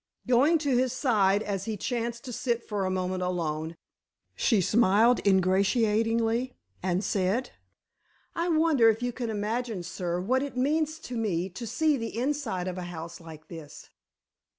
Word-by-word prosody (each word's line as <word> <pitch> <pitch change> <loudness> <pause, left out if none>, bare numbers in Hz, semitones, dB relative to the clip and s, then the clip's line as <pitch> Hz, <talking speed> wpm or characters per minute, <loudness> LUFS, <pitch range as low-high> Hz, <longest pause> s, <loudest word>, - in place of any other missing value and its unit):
Going 265 +7 +4
to 285 -4 0
his 255 0 +2
side, 210 -6 +2
as 195 -2 -3
he 220 -2 -3
chanced 235 +2 -3
to 250 - -6
sit 240 -1 -1
for 205 -3 -1
a - - 0
moment 185 0 -2
alone, 165 -3 -2 0.6
she 225 - +2
smiled 225 +4 +4
ingratiatingly 225 +5 +2 0.3
and 185 +1 0
said: 200 +6 0 0.8
"I 340 +1 0
wonder 310 -8 +4
if 225 +2 0
you 245 - 0
can 240 -2 -4
imagine, 220 -1 -2
sir, 175 0 -3
what 250 +8 +1
it 275 -3 -5
means 310 +4 +1
to 245 - -7
me 190 -6 -1
to 230 +6 -7
see 305 +5 +1
the 230 -2 -5
inside 245 -9 -1
of 185 0 -4
a 180 - -5
house 170 -1 -7
like 155 -2 -12
this?" 160 -4 -11
225 Hz, 160 wpm, -28 LUFS, 185-250 Hz, 0.8 s, Going